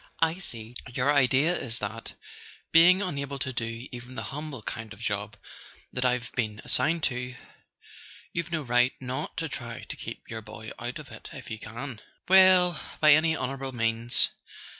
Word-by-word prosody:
"I 165 +2 +2
see. 115 - -6 0.2
Your 125 +4 +2
idea 140 +5 +4
is 125 -6 -2
that, 110 +2 -5 0.6
being 180 +4 +7
unable 140 -6 -3
to 130 -1 -3
do 115 +1 -3
even 125 +1 -9
the - - -3
humble 145 -5 -5
kind 115 0 -5
of 110 - -15
job 105 -1 -3 0.6
that 125 - -1
I've 125 -1 +1
been 110 -4 -2
assigned 155 +5 +2
to, 125 -1 -1 1.0
you've 170 -1 -2
no 160 -3 -1
right 125 0 +3
not 130 +5 -4
to 165 -1 -1
try 120 -5 -6
to - - -6
keep - - -8
your 110 -1 -5
boy 110 0 -9
out 120 +1 -4
of - - -10
it - - -10
if - - -9
you 110 - -4
can?" 120 +2 -4 0.3
"Well—by 180 -5 +6
any 160 +1 +4
honourable 135 +1 -3
means." 115 0 +3
125 Hz, 165 wpm, -28 LUFS, 115-155 Hz, 1.0 s, being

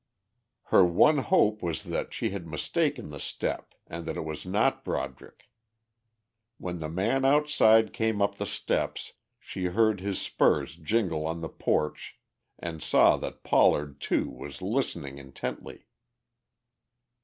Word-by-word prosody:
Her - - +8
one 115 - +4
hope 105 -4 +2
was 85 -5 -3
that - - -3
she - - -2
had 95 -4 -6
mistaken 140 - -1
the 75 -1 -8
step - - -4
and 85 +1 -7
that 80 - -3
it - - -4
was 80 +3 -6
not 100 +5 +1
Broderick. 65 0 -5 1.1
When 90 -1 -5
the 80 -1 -4
man 105 +11 0
outside 135 -6 +4
came 110 -2 0
up 100 0 +1
the - - -2
steps, - - -2 0.2
she 95 - -6
heard 105 +3 +2
his 100 0 -2
spurs 70 - +1
jingle 85 -2 -1
on 80 +1 -4
the 80 - -4
porch 75 0 -2 0.4
and 80 -2 -6
saw - - +5
that - - -7
Pollard 75 -1 +3
too - - 0
was 70 +6 -9
listening 85 - -2
intently. 70 -1 -7
90 Hz, 140 wpm, -28 LUFS, 80-110 Hz, 1.1 s, Her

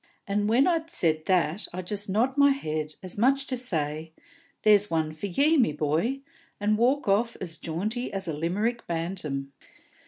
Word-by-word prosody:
And, 205 +1 0
when 245 +5 +4
I'd 330 -2 0
said 155 - +2
that, 180 +1 +1
I 185 +1 -5
just 205 +2 -1
nod 235 +7 +1
my 285 0 +6
head, 155 - -2
as 185 +2 -4
much 270 +4 +3
as - - -14
to 255 - 0
say, 160 -8 -3 0.5
'There's 210 -1 +5
one 160 -1 -1
for 155 +6 -5
ye, 290 - +3
me 235 - +3
boy!' 160 - -1 0.4
and 210 +1 +2
walk 260 +3 +2
off 220 +4 +1
as 165 -2 -5
jaunty 205 - -3
as 195 -2 -3
a 160 - -2
Limerick 205 +10 -2
bantam." 165 -5 -3
195 Hz, 180 wpm, -27 LUFS, 160-240 Hz, 0.5 s, my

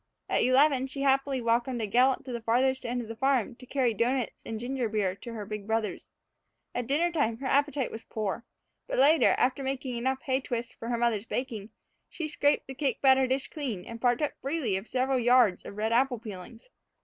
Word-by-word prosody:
At - - +1
eleven 265 +1 +4
she 275 +1 -6
happily 270 -1 +2
welcomed 235 +2 +1
a 220 - -1
gallop 250 +6 +2
to 260 - -6
the 235 -1 -4
farthest 255 +4 +1
end 245 0 -2
of - - -10
the 225 - -6
farm 260 -2 +1
to 255 - -14
carry 250 -3 +1
doughnuts 240 +3 -1
and 220 -1 -5
ginger 245 -1 -2
beer 205 -4 0
to 235 - -8
the 215 -3 -6
big 210 0 -6
brothers. 220 -4 -2 0.6
At 245 -1 -3
dinner 325 +6 +2
time 260 -9 0
her 270 - -8
appetite 285 -1 +1
was 225 - -7
again - - -28
poor, 215 +1 -3 0.4
but - - -3
later, 300 +4 +5
after 255 +2 +1
making 265 -2 -3
enough 260 +2 -1
hay 265 0 0
twists 240 -2 -4
for 230 - -7
her 240 - 0
mother's 230 -2 0
baking, 225 -5 -4 0.4
she 320 - -4
scraped 290 -1 +1
the 265 - -7
cake 275 0 -1
batter 265 -1 +5
dish 260 +1 -1
clean 245 - -4
and 230 0 -9
partook 245 +4 +1
freely 275 -7 -1
of 195 +4 -4
several 260 +1 +1
yards 245 -5 +4
of 200 - -9
red 220 +2 0
apple 250 +1 +2
peelings. 215 +1 -10
250 Hz, 210 wpm, -28 LUFS, 225-270 Hz, 0.6 s, later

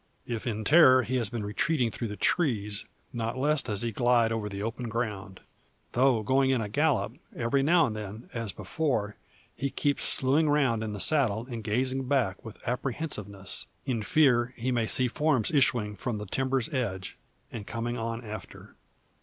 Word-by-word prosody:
If 120 +1 -4
in 110 -2 -2
terror 130 -1 +7
he 130 +2 -1
has 115 -4 0
been 115 -2 -4
retreating 120 - 0
through 115 - -4
the 105 - -6
trees, 105 - 0 0.3
not 115 0 -3
less 150 +2 +2
does 105 -3 -2
he 115 - -1
glide 120 0 +3
over 110 -2 -2
the 100 0 -5
open 115 +2 -4
ground. 105 -5 -4 0.5
Though 125 -3 +3
going 130 +4 +2
in 130 -2 +2
a 110 - -2
gallop, - - 0 0.2
every 120 +4 +1
now 165 +3 +4
and 110 -5 -3
then, 105 +2 -7
as 115 -3 -3
before, 105 0 -2 0.4
he 140 +4 -2
keeps 140 +1 0
slewing 145 +4 +3
round 135 -7 +2
in 110 -1 -4
the 105 - -6
saddle 120 -5 +2
and 115 -2 -5
gazing 130 +4 -1
back 120 -9 0
with 110 -2 -9
apprehensiveness, 115 - -2 0.2
in 120 -4 -1
fear 125 -1 +3
he 125 +2 -1
may 115 -3 +1
see 130 +3 +3
forms 130 -2 +1
issuing 120 -8 +2
from 115 +3 -3
the 105 - -5
timber's 130 +4 0
edge, 100 -8 -3 0.4
and 105 -3 -7
coming 120 +1 -3
on 115 0 -4
after. 105 -3 -9
120 Hz, 180 wpm, -28 LUFS, 105-130 Hz, 0.5 s, terror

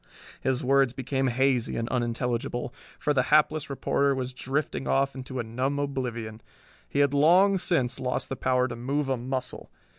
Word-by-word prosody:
His 130 -1 0
words 135 -1 +3
became 135 +1 -1
hazy 130 -1 +1
and 115 - -2
unintelligible, 120 +1 -2 0.2
for 150 - 0
the 130 - +3
hapless 155 0 +3
reporter 140 0 +1
was 130 -1 -3
drifting 135 +2 -2
off 135 0 +2
into 130 0 -7
a - - -1
numb 130 +5 -2
oblivion. 120 -6 -3 0.5
He 140 - +1
had 140 -1 +3
long 180 +7 +5
since 135 -9 0
lost 125 -1 -1
the 135 - -4
power 125 -1 +1
to 120 - -6
move 135 +4 -2
a 130 - +1
muscle. 130 +1 -4
130 Hz, 170 wpm, -27 LUFS, 125-140 Hz, 0.5 s, long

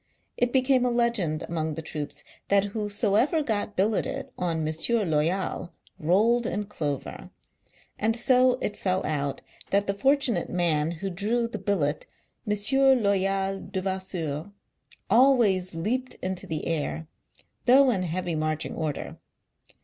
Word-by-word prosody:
It 245 0 +1
became 260 -1 +3
a 250 - +2
legend 235 -10 0
among 160 -2 -2
the 160 - -6
troops 150 -2 -5 0.2
that 200 -1 +4
whosoever 215 - +1
got 210 -4 -2
billeted 205 +3 0
on 165 -3 -1
M. 155 - -1 0.4
Loyal, 170 +3 -1 0.3
rolled 215 +9 +3
in 210 - -2
clover; 150 -9 -5 0.7
and 225 +1 +2
so 255 +1 +4
it 210 - -1
fell 185 -1 -1
out 140 -2 -2 0.3
that 200 +1 +2
the 200 - 0
fortunate 265 -4 +2
man 165 -4 +1
who 175 +3 -4
drew 220 +6 0
the 230 - -6
billet 155 -8 -1 0.4
"M. 210 - +1 0.5
Loyal 195 -1 +1
Devas 190 0 -4
seur 160 0 -4 0.3
" - - -51 0.3
always 225 -9 +4
leaped 250 +10 -2
into 185 -1 -5
the 155 -1 -3
air, 160 0 -2 0.6
though 265 +1 +6
in 195 -5 0
heavy 180 0 -2
marching 155 0 -2
order. 155 -3 -4
195 Hz, 135 wpm, -26 LUFS, 160-230 Hz, 0.7 s, though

